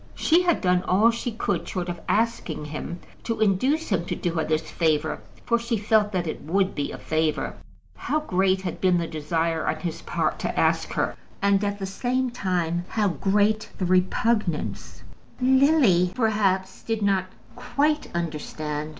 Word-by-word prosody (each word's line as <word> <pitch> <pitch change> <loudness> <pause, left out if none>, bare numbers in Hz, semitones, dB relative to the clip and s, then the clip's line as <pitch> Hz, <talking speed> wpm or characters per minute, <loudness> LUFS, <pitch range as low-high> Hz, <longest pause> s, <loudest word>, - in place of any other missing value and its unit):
She 335 +2 +4
had 350 -2 +2
done 180 -1 +3
all 210 +6 +5
she 235 +1 -3
could, 200 -5 -2
short 180 -2 -3
of 175 -1 -5
asking 210 -9 0
him, 155 +3 -6 0.2
to 230 -2 -2
induce 255 - +2
him 185 -5 +1
to - - -3
do 175 - -2
her 160 -1 0
this 155 +1 0
favour; 155 -2 0 0.2
for 235 0 +2
she 235 0 -1
felt 210 0 +2
that 180 -3 -1
it 155 - -4
would 190 +6 0
be 145 - -3
a - - -6
favour. 155 -1 -1 0.4
How 305 - -1
great 190 -7 +1
had 180 - -4
been 185 -2 +4
the 170 - 0
desire 160 +1 -1
on 155 - -1
his 170 -1 -4
part - - -1
to - - -2
ask - - +1
her, - - -1 0.2
and, 200 0 +2
at 205 0 -1
the 195 - -4
same 250 +6 -1
time, 175 -6 -1
how 210 -3 +1
great 205 +6 +1
the 185 - -1
repugnance, 185 0 0 0.4
Lily, 260 - +4
perhaps, 195 -5 +1
did 225 -2 -2
not 195 -2 +2 0.3
quite 295 +5 0
understand. 155 -2 -3
190 Hz, 170 wpm, -25 LUFS, 170-225 Hz, 0.4 s, all